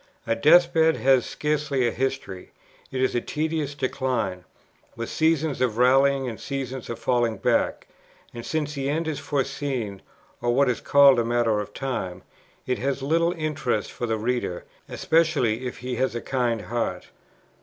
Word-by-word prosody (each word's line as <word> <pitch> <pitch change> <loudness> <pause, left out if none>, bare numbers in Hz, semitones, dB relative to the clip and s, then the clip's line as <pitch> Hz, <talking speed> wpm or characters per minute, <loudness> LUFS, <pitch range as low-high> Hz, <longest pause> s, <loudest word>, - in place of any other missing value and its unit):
A - - +1
death 170 +8 +5
bed 160 0 +4
has 130 -2 +3
scarcely 150 -4 0
a - - 0
history; 130 -8 -4 0.4
it 130 - -3
is 130 - +1
a 120 - 0
tedious 155 -1 -2
decline, 125 -9 -2 0.5
with 115 0 -5
seasons 160 -4 +1
of 120 -4 +1
rallying 135 +2 +4
and 115 -3 -6
seasons 135 -2 -5
of 120 - -4
falling 120 -3 0
back; - - 0 0.5
and 120 -1 -7
since 150 +1 -2
the 140 -1 -2
end 160 +3 -1
is 150 -3 -2
foreseen, 135 -7 -3 0.4
or 120 0 +1
what 135 -1 +4
is 120 - -5
called 140 -3 +6
a - - +2
matter 115 -2 +1
of 105 0 -5
time, 105 -9 -4 0.4
it 125 - -1
has 135 +1 -2
little 165 +4 +2
interest 155 - -2
for 120 - -4
the 110 -1 0
reader, 115 -5 -2 0.2
especially 140 -8 +1
if 125 - -6
he 125 -1 -4
has 130 -2 0
a 120 - -3
kind 120 -4 -1
heart. 110 -5 -3
130 Hz, 165 wpm, -25 LUFS, 120-145 Hz, 0.5 s, called